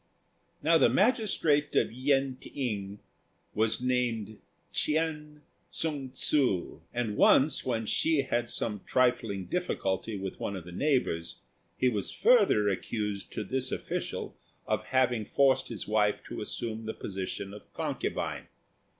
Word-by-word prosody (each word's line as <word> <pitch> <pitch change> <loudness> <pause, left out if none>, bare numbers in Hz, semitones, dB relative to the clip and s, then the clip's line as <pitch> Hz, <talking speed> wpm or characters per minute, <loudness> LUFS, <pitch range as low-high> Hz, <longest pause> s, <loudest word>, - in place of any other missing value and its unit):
Now 165 +1 +5
the - - +6
magistrate 190 - +2
at - - +3
Yen 135 +1 +1
t'ing 105 -8 -4 0.6
was 110 +2 +1
named 115 -4 0 0.3
Ch'ên 150 -1 -1 0.3
Tsung 145 -5 -3
ssŭ, 130 - 0
and 120 -3 -2
once 140 +8 +5
when 115 -3 -1
Hsi 155 +6 +2
had 120 -3 -1
some 105 -4 -2
trifling 120 -6 +1
difficulty 110 - -2
with 95 -1 -5
one 100 - -3
of 95 - -6
the 90 - -10
neighbours 95 - 0 0.4
he 130 - +3
was 105 -5 0
further 460 - +4
accused 100 +1 -2
to 110 - -3
this 130 +5 -2
official - - -4 0.3
of - - -1
having 125 -4 +2
forced 135 +4 +3
his 115 -4 -6
wife 105 -1 +2
to - - -5
assume 110 -1 -4
the 110 - -3
position 95 0 -5
of 105 - -12
concubine. - - -3
120 Hz, 135 wpm, -29 LUFS, 105-140 Hz, 0.6 s, the